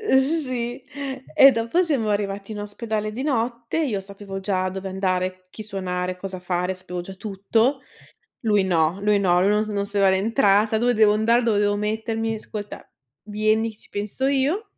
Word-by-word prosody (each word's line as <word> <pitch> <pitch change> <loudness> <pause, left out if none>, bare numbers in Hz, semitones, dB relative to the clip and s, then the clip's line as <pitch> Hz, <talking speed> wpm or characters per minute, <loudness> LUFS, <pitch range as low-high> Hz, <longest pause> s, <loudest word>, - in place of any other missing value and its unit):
Ehm 315 -5 +2
sì, 245 -1 -4 0.5
e 270 0 +8
dopo 230 +9 +1
siamo 260 -10 0
arrivati 205 0 -2
in 210 - -5
ospedale 215 0 -3
di 250 - -4
notte, 235 -1 -1
io 245 -11 0
sapevo 195 0 -8
già 185 -1 0
dove 190 +1 -5
andare, 185 -1 -2
chi 215 - -8
suonare, 185 -3 -3
cosa 185 -1 -6
fare, 180 +1 -1
sapevo 180 -1 -6
già 190 +2 -9
tutto. 220 +7 0 0.6
Lui 210 -3 +3
no, 170 -1 +1
lui 205 0 +3
no, 180 -2 +3
lui 195 - +3
non 210 +1 +2
non 200 -1 -1
sapeva 200 -1 +2
l'entrata, 210 +1 +3
"Dove 245 +2 +2
devo 215 -1 +5
andare, 230 +3 +3
dove 215 -3 +2
devo 205 0 +2
mettermi?' 220 +1 -2
'Ascolta, 210 -1 -8 0.3
vieni, 215 +1 0
ci - - -17
penso 210 +6 -2
io". 280 +10 +1
210 Hz, 170 wpm, -23 LUFS, 195-230 Hz, 0.6 s, e